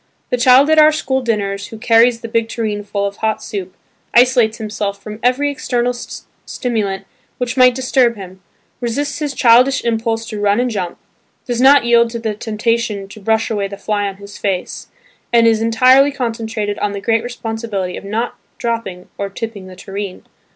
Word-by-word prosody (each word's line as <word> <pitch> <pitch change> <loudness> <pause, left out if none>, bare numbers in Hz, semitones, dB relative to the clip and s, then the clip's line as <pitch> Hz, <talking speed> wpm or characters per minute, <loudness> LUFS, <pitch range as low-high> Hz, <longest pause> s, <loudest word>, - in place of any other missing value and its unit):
The 250 - +2
child 255 +3 +6
at 315 - +5
our 305 0 +7
school 265 -3 -1
dinners 200 -4 -2
who 225 - -10
carries 230 +1 +3
the 230 - -5
big 225 0 -1
tureen 215 -3 -3
full 200 0 -2
of 200 0 -4
hot 220 0 -1
soup, 195 -4 -6 0.4
isolates 240 -2 +4
himself 210 -2 -4
from 210 +1 -9
every 265 +4 +2
external 245 -4 -1
stimulant 220 -4 -5 0.3
which 250 0 -2
might 250 -2 +5
disturb 255 -2 +2
him, 190 -2 -11 0.4
resists 270 +5 -2
his 290 -3 -3
childish 250 +3 +4
impulse 225 0 -1
to 215 - -5
run 205 +1 +2
and 250 0 0
jump, 185 -5 -4 0.5
does 245 -1 -2
not 270 -1 +6
yield 235 0 +4
to 235 - -5
the 220 -2 -2
temptation 215 -1 -2
to 215 - -11
brush 220 +2 0
away 205 -2 -1
the 200 0 -8
fly 205 0 -1
on 195 -1 -6
his 200 0 -11
face, 190 -3 -3 0.4
and 235 -1 +5
is 225 -1 +3
entirely 255 +5 +5
concentrated 225 -5 -3
on 205 -1 -1
the 200 - -4
great 225 +2 +1
responsibility 225 -6 -4
of - - -8
not 220 +4 -2 0.2
dropping 230 -6 -4
or 200 0 -2
tipping 200 -1 -6
the 185 - -11
tureen. 195 0 -7
225 Hz, 180 wpm, -17 LUFS, 205-245 Hz, 0.5 s, our